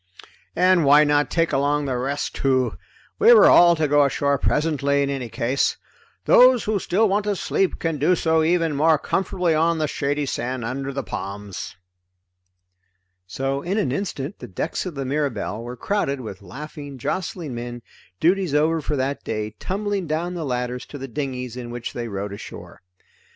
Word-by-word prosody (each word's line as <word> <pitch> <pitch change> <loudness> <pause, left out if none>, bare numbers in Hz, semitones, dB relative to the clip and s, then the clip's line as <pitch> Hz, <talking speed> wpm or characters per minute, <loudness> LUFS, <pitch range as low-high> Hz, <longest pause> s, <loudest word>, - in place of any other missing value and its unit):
"And 180 0 +4
why 145 +1 +6
not 145 -1 +2
take 165 -1 0
along 145 +1 +1
the 130 -2 -1
rest 140 +4 -2
too? 130 -2 +1 0.4
We 460 +2 +8
were - - +7
all 175 -1 +7
to 155 -2 0
go 145 0 +4
ashore 140 0 +1
presently, 140 -2 +1
in 140 - -1
any 130 -4 -4
case. 125 +5 0 0.5
Those 250 -2 +6
who 210 -1 0
still 205 +5 +2
want 205 +1 0
to 205 -1 0
sleep 190 0 0
can 165 -3 -2
do 170 +6 +3
so 160 -1 +2
even 165 -1 +1
more 155 +2 +4
comfortably 180 +1 0
on 165 +2 +2
the 155 -1 0
shady 145 +1 -1
sand 125 -2 -3
under 135 +3 -3
the 140 0 -4
palms." 100 0 -6 1.5
So 135 +8 -2
in 185 +6 -2
an 200 -12 0
instant 150 0 -4
the - - -8
decks 155 - -3
of 175 - -6
the 135 -1 -3
Mirabelle 130 -6 -2
were 120 +1 -7
crowded 140 - -1
with 110 -5 -8
laughing 145 - -9
jostling 165 +1 -3
men, 120 0 -6 0.4
duties 180 -2 +2
over 160 +2 +2
for 150 +1 -2
that 135 +1 -2
day, 110 -1 -3
tumbling 200 -1 -2
down 165 +4 -2
the 170 -3 -4
ladders 125 -1 -3
to 145 - -8
the 135 0 -6
dinghies 125 -2 -4
in 125 -1 -7
which 120 0 -6
they 120 -1 -4
rowed 100 -1 -4
ashore. 100 - -10
145 Hz, 175 wpm, -23 LUFS, 125-165 Hz, 1.5 s, We